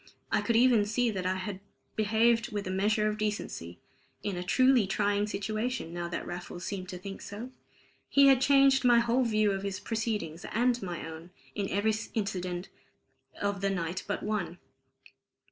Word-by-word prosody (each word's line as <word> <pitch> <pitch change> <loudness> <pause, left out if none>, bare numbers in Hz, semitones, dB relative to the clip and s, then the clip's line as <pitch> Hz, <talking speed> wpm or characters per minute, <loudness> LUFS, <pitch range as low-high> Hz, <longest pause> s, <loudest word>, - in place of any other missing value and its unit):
I - - +3
could 235 - 0
even 235 -2 +5
see 235 +2 +1
that 185 -3 -2
I 185 - +1
had 185 +1 -4 0.4
behaved 225 +2 +2
with 205 -1 -3
a 185 - -3
measure 210 +3 +2
of 215 0 -2
decency, 205 - -3 0.5
in 200 -3 -2
a 175 - -3
truly 255 +2 +4
trying 205 +1 +1
situation, 215 -1 -3
now 175 0 -3
that 170 - -4
Raffles 175 0 -6
seemed 185 -2 -4
to 180 - -5
think 195 +2 -8
so. 225 +5 -7 0.6
He 280 0 +6
had 270 -2 +6
changed 275 -1 +5
my 240 -1 +6
whole 235 +2 +3
view 215 -2 +2
of 195 0 -2
his 195 -1 -3
proceedings 210 -8 -3
and 245 +2 +1
my 175 -4 -5
own, 160 +2 -9 0.2
in 200 -2 -2
every 210 +2 +1 0.2
incident 185 -4 -2 0.7
of 200 -1 -1
the 195 - +1
night 180 -1 -2
but 205 - -2
one. 185 -5 -2
205 Hz, 175 wpm, -30 LUFS, 185-230 Hz, 0.7 s, He